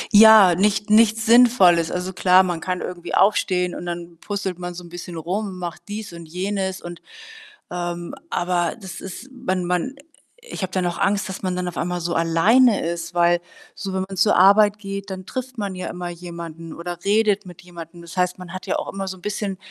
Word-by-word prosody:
Ja, 215 -4 +9
nicht 205 +3 +1
nichts 220 0 +4
Sinnvolles. 220 -8 +5
Also, 180 +1 -3
klar, 185 +1 +5
man 175 -3 -2
kann 180 +2 -3
irgendwie 175 -1 -5
aufstehen 185 -3 +2
und 175 - -7
dann 170 -1 -6
puzzelt 195 -3 -4
man 175 0 -6
so 180 - -8
'n 170 - -12
bisschen 175 0 -8
rum, 185 +3 -3
macht 175 -2 -6
dies 205 -3 -6
und 170 -1 -10
jenes 190 +2 -3
und, 175 -1 -9 0.7
ähm 175 -1 -4 0.2
aber 175 -1 0
das 190 -3 -8
ist 230 +8 -9
man 190 -9 -2
man 180 +10 -1 0.4
ich 485 - -8
habe 185 - -3
dann 185 -2 0
auch 175 - -4
Angst, 195 -1 +1
dass 190 - -6
man 185 -1 -1
dann 180 0 -2
auf 175 - -6
einmal 180 0 -2
so 170 +1 -2
alleine 195 +8 +4
ist, 170 0 -4
weil 175 0 +4 0.4
so, 195 -1 -5
wenn 190 - -1
man 195 -1 -8
zur 215 - +4
Arbeit 205 +2 +6
geht, 200 0 -6
dann 185 -1 -7
trifft 255 +2 -6
man 200 -3 -3
ja 185 - -5
immer 175 0 -5
jemanden 170 -2 -8
oder 175 +1 -6
redet 205 -1 +2
mit 175 -2 -12
jemandem. 170 -1 -11
Das 170 +1 -11
heißt, 180 0 +1
man 180 -1 -9
hat 185 +1 -7
ja - - 0
auch - - -5
immer 195 -1 -4
so 190 - -5
'n 180 - -19
bisschen 205 -2 -3
185 Hz, 210 wpm, -22 LUFS, 175-200 Hz, 0.7 s, Ja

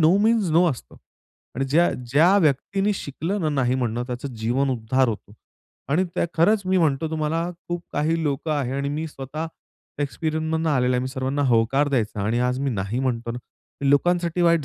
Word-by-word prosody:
No 160 +4 +5
means 220 -5 +3
no 170 +3 +5
असतं 125 - -8 0.6
आणि 135 - 0
ज्या 160 +6 +3 0.2
ज्या 170 +7 +5
व्यक्तींनी 195 +6 +1
शिकलं 175 +5 -3
ना 155 - +1
नाही 130 -4 +1
म्हणणं 120 -2 -1
त्याचं 125 +2 -4
जीवन 125 +5 0
उद्धार 125 +2 +1
होतो 105 -2 -5 0.6
आणि 185 +5 +3
त्या - - +1
खरंच 200 +5 +3
मी 185 0 +3
म्हणतो 155 -1 +1
तुम्हाला 160 +2 -1 0.2
खूप 175 0 -3
काही 160 +2 0
लोकं 145 +1 -1
आहे 135 -4 -1
आणि 140 0 -1
मी 155 +3 -3
स्वतः 145 +3 -5 0.6
एक्सपिरियन्सनं 160 +2 -1
आलेलो 125 -2 +2
आहे. 125 - +1
मी 130 - -2
सर्वांना 135 +2 -2
होकार 125 +5 +3
द्यायचा 110 -6 -1
आणि 110 +4 0
आज 125 +1 -1
मी 140 -1 0
नाही 100 +2 -2
म्हणतो 120 -3 -1
ना, 120 - -4 0.4
मी 140 0 +2
लोकांसाठी 175 +3 +2
वाईट 170 -3 +3
145 Hz, 185 wpm, -23 LUFS, 130-165 Hz, 0.6 s, No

